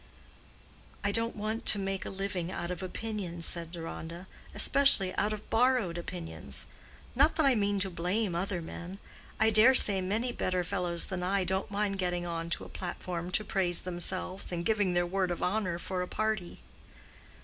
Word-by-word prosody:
"I 205 Hz, -, +2 dB
don't 230 Hz, +2 st, 0 dB
want 215 Hz, +2 st, -3 dB
to -, -, +7 dB
make 195 Hz, -1 st, -2 dB
a -, -, -4 dB
living 190 Hz, -2 st, -3 dB
out 175 Hz, -1 st, -4 dB
of 180 Hz, -, -4 dB
opinions," 185 Hz, -3 st, -4 dB
said 170 Hz, -1 st, -1 dB
Deronda; 170 Hz, +1 st, -7 dB, 0.3 s
"especially 270 Hz, -10 st, +5 dB
out 210 Hz, -, +1 dB
of 215 Hz, 0 st, -5 dB
borrowed 235 Hz, -6 st, +3 dB
opinions. 175 Hz, -1 st, -5 dB, 0.5 s
Not 280 Hz, +6 st, +4 dB
that 315 Hz, -, +3 dB
I 270 Hz, -, +6 dB
mean 205 Hz, -3 st, +1 dB
to 190 Hz, -, +1 dB
blame 180 Hz, +4 st, -1 dB
other 175 Hz, 0 st, -2 dB
men. 175 Hz, +3 st, -7 dB, 0.4 s
I 220 Hz, +1 st, +4 dB
dare 225 Hz, +5 st, +7 dB
say 200 Hz, -5 st, +4 dB
many 215 Hz, +7 st, -1 dB
better 185 Hz, -5 st, -1 dB
fellows 175 Hz, -2 st, 0 dB
than 185 Hz, -1 st, -3 dB
I 190 Hz, +2 st, +1 dB
don't 190 Hz, +2 st, -1 dB
mind 200 Hz, -1 st, -1 dB
getting 175 Hz, -1 st, -1 dB
on 165 Hz, -1 st, -3 dB
to -, -, -1 dB
a -, -, -9 dB
platform 175 Hz, -1 st, -5 dB
to 200 Hz, +4 st, 0 dB
praise 180 Hz, -4 st, +2 dB
themselves, 185 Hz, +1 st, 0 dB
and 170 Hz, -1 st, -3 dB
giving 205 Hz, -5 st, +2 dB
their 175 Hz, 0 st, +3 dB
word 185 Hz, +1 st, 0 dB
of 175 Hz, -, -3 dB
honor 185 Hz, -3 st, 0 dB
for 180 Hz, +1 st, -3 dB
a 180 Hz, -, -2 dB
party." 215 Hz, -4 st, -2 dB
190 Hz, 180 wpm, -30 LUFS, 175-210 Hz, 0.5 s, to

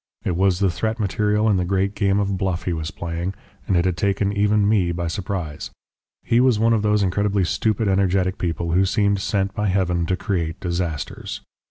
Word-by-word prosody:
It 90 Hz, -, 0 dB
was 95 Hz, 0 st, +2 dB
the 95 Hz, -1 st, +2 dB
threat 110 Hz, +6 st, -2 dB
material 105 Hz, +2 st, +1 dB
in 105 Hz, -3 st, +3 dB
the 90 Hz, -, +1 dB
great 95 Hz, +2 st, 0 dB
game 100 Hz, -1 st, +1 dB
of 100 Hz, -1 st, 0 dB
bluff 95 Hz, -2 st, -2 dB
he 90 Hz, -, -1 dB
was 80 Hz, -1 st, -3 dB
playing, 85 Hz, +3 st, -4 dB, 0.3 s
and 95 Hz, -5 st, +2 dB
it 85 Hz, -, +2 dB
had 90 Hz, -2 st, 0 dB
taken 100 Hz, 0 st, 0 dB
even 105 Hz, 0 st, +2 dB
me 100 Hz, -5 st, +2 dB
by 85 Hz, 0 st, -3 dB
surprise. 85 Hz, -3 st, -4 dB, 0.5 s
He 115 Hz, -, +2 dB
was 125 Hz, -3 st, +4 dB
one 115 Hz, +2 st, +3 dB
of 110 Hz, -, +2 dB
those 105 Hz, -1 st, +2 dB
incredibly 100 Hz, +1 st, +1 dB
stupid 110 Hz, +4 st, 0 dB
energetic 95 Hz, -1 st, +1 dB
people 85 Hz, -1 st, -2 dB
who 90 Hz, +3 st, +3 dB
seem 100 Hz, +1 st, +2 dB
sent 95 Hz, 0 st, -1 dB
by 105 Hz, +1 st, -1 dB
Heaven 90 Hz, -3 st, 0 dB
to 90 Hz, -, +1 dB
create 85 Hz, -6 st, -2 dB
disasters. 85 Hz, -4 st, -4 dB
95 Hz, 200 wpm, -22 LUFS, 90-105 Hz, 0.5 s, was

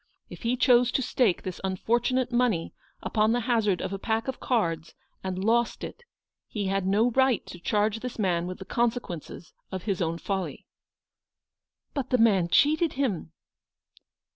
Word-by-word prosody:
If -, -, -9 dB
he 240 Hz, +2 st, 0 dB
chose 245 Hz, -1 st, +5 dB
to -, -, +2 dB
stake 240 Hz, -6 st, +1 dB
this 185 Hz, -2 st, -6 dB
un 190 Hz, -1 st, -1 dB
fortunate 240 Hz, +5 st, +1 dB
money 240 Hz, -9 st, +1 dB, 0.3 s
upon 215 Hz, +1 st, +2 dB
the 245 Hz, -, +1 dB
hazard 220 Hz, -6 st, +1 dB
of 190 Hz, -, -3 dB
a 195 Hz, -, -4 dB
pack 225 Hz, +3 st, -1 dB
of 265 Hz, -, -3 dB
cards, 165 Hz, -10 st, -1 dB, 0.3 s
and 190 Hz, 0 st, -3 dB
lost 235 Hz, +2 st, +1 dB
it, 480 Hz, -, -8 dB, 0.4 s
he 205 Hz, -2 st, -3 dB
had 195 Hz, 0 st, 0 dB
no 215 Hz, +5 st, +3 dB
right 260 Hz, -1 st, +2 dB
to 175 Hz, -, -10 dB
charge 210 Hz, +4 st, +1 dB
this 250 Hz, +1 st, -6 dB
man 175 Hz, -5 st, 0 dB
with 185 Hz, -, -5 dB
the 190 Hz, -, -9 dB
consequences 230 Hz, -, -3 dB, 0.2 s
of 190 Hz, -2 st, -4 dB
his 195 Hz, -3 st, -1 dB
own 165 Hz, -1 st, 0 dB
folly." 190 Hz, +2 st, -4 dB, 1.3 s
"But 275 Hz, -4 st, -3 dB
the 255 Hz, -, +3 dB
man 205 Hz, -7 st, +4 dB
cheated 310 Hz, -, +3 dB
him 215 Hz, -, -2 dB
220 Hz, 165 wpm, -27 LUFS, 190-245 Hz, 1.3 s, chose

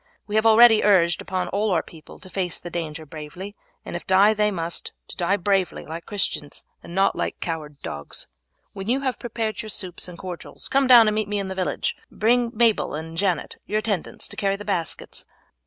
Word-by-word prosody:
We 205 Hz, -, -8 dB
have 220 Hz, +1 st, +4 dB
already 225 Hz, 0 st, +8 dB
urged 175 Hz, -5 st, +4 dB
upon 185 Hz, -1 st, -2 dB
all 210 Hz, +2 st, 0 dB
our 170 Hz, -4 st, +2 dB
people 160 Hz, -3 st, -13 dB
to -, -, -12 dB
face 180 Hz, -3 st, -1 dB
the 175 Hz, -, -8 dB
danger 160 Hz, -2 st, -4 dB
bravely, 160 Hz, +7 st, -8 dB, 0.3 s
and -, -, -6 dB
if 175 Hz, -, -6 dB
die 195 Hz, +3 st, +6 dB
they 210 Hz, 0 st, +2 dB
must, 170 Hz, -4 st, -4 dB, 0.2 s
to -, -, -7 dB
die 185 Hz, +3 st, +1 dB
bravely 195 Hz, -1 st, 0 dB
like 165 Hz, +2 st, -7 dB
Christians, 195 Hz, -8 st, -2 dB, 0.2 s
and 170 Hz, -, -10 dB
not 195 Hz, +1 st, +3 dB
like -, -, -3 dB
coward 150 Hz, -4 st, -4 dB
dogs. 75 Hz, 0 st, -5 dB, 0.5 s
When 195 Hz, 0 st, -6 dB
you 265 Hz, +3 st, +2 dB
have 260 Hz, -2 st, -1 dB
prepared 225 Hz, -2 st, -3 dB
your 215 Hz, -, -8 dB
soups 185 Hz, -3 st, -3 dB
and 175 Hz, -1 st, -9 dB
cordials 180 Hz, -1 st, -6 dB
come 275 Hz, 0 st, +3 dB
down 240 Hz, -3 st, +9 dB
and 215 Hz, -, +3 dB
meet 215 Hz, -1 st, 0 dB
me 205 Hz, 0 st, -1 dB
in 195 Hz, -1 st, -2 dB
the -, -, -3 dB
village, 185 Hz, -1 st, -1 dB
bringing 235 Hz, +2 st, +2 dB
Mabel 225 Hz, -7 st, +2 dB
and 160 Hz, +1 st, -6 dB
Janet, 180 Hz, -2 st, 0 dB
your 210 Hz, -, 0 dB
attendants, 210 Hz, -5 st, -2 dB
to -, -, -8 dB
carry 195 Hz, -2 st, +1 dB
the 205 Hz, +1 st, -9 dB
baskets." 180 Hz, -5 st, -3 dB
195 Hz, 205 wpm, -24 LUFS, 170-215 Hz, 0.5 s, down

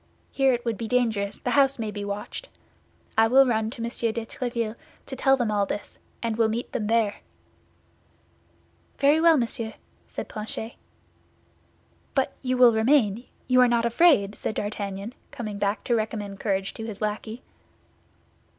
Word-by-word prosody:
Here 270 Hz, -1 st, +3 dB
it 240 Hz, -1 st, -2 dB
would 230 Hz, -4 st, -2 dB
be 230 Hz, -, -3 dB
dangerous; 220 Hz, -5 st, 0 dB
the 245 Hz, -, -3 dB
house 275 Hz, +1 st, +4 dB
may 220 Hz, -3 st, -3 dB
be 205 Hz, -1 st, -5 dB
watched. 205 Hz, -, -5 dB, 0.7 s
I 225 Hz, -, +6 dB
will 265 Hz, +3 st, +6 dB
run 220 Hz, -3 st, +1 dB
to 230 Hz, 0 st, -7 dB
Monsieur 235 Hz, -1 st, -1 dB
de 230 Hz, 0 st, -4 dB
Tréville 235 Hz, -2 st, -3 dB, 0.3 s
to 265 Hz, -, -6 dB
tell 270 Hz, +1 st, +3 dB
them 240 Hz, -4 st, 0 dB
all 205 Hz, -1 st, +1 dB
this, 205 Hz, -, -6 dB, 0.2 s
and 225 Hz, -1 st, -1 dB
will 225 Hz, -1 st, +3 dB
meet 230 Hz, +2 st, -3 dB
them 210 Hz, -, -2 dB
there." 225 Hz, -2 st, +2 dB, 1.8 s
"Very 290 Hz, +3 st, +4 dB
well, 330 Hz, -1 st, +6 dB
monsieur," 230 Hz, -2 st, -2 dB, 0.3 s
said -, -, -6 dB
Planchet. 220 Hz, +2 st, -6 dB, 1.4 s
"But 270 Hz, -1 st, +1 dB
you 255 Hz, -1 st, -1 dB
will 245 Hz, -2 st, +7 dB
remain; 225 Hz, -1 st, +2 dB, 0.2 s
you 255 Hz, 0 st, +5 dB
are 250 Hz, -, +6 dB
not 235 Hz, -1 st, +2 dB
afraid?" 235 Hz, -, +4 dB
said 215 Hz, -, -4 dB
D'Artagnan, 205 Hz, +1 st, -4 dB, 0.2 s
coming 210 Hz, -4 st, -6 dB
back 205 Hz, +1 st, 0 dB
to 240 Hz, -, 0 dB
recommend 210 Hz, -3 st, -3 dB
courage 195 Hz, -2 st, -1 dB
to 225 Hz, -, -6 dB
his 205 Hz, -3 st, -7 dB
lackey. 215 Hz, +2 st, -4 dB
225 Hz, 160 wpm, -25 LUFS, 210-250 Hz, 1.8 s, will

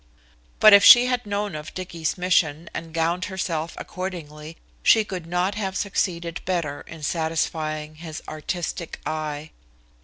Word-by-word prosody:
But 215 Hz, -1 st, +8 dB
if 200 Hz, 0 st, +8 dB
she 245 Hz, 0 st, +10 dB
had 250 Hz, -3 st, -1 dB
known 205 Hz, -1 st, -2 dB
of 150 Hz, +1 st, -7 dB
Dicky's 170 Hz, -3 st, -3 dB
mission 170 Hz, -3 st, +1 dB
and 165 Hz, 0 st, -6 dB
gowned 165 Hz, +2 st, 0 dB
herself 170 Hz, -4 st, -3 dB
accordingly 165 Hz, -4 st, -7 dB, 0.2 s
she 220 Hz, -, +5 dB
could 180 Hz, -5 st, -6 dB
not 180 Hz, +3 st, 0 dB
have 195 Hz, -2 st, -3 dB
succeeded 175 Hz, -4 st, -2 dB
better 165 Hz, -6 st, -2 dB
in 160 Hz, -2 st, -10 dB
satisfying 155 Hz, -1 st, -2 dB
his 160 Hz, -1 st, -8 dB
artistic 170 Hz, +1 st, -4 dB
eye. 155 Hz, -1 st, -4 dB
170 Hz, 140 wpm, -24 LUFS, 155-190 Hz, 0.2 s, she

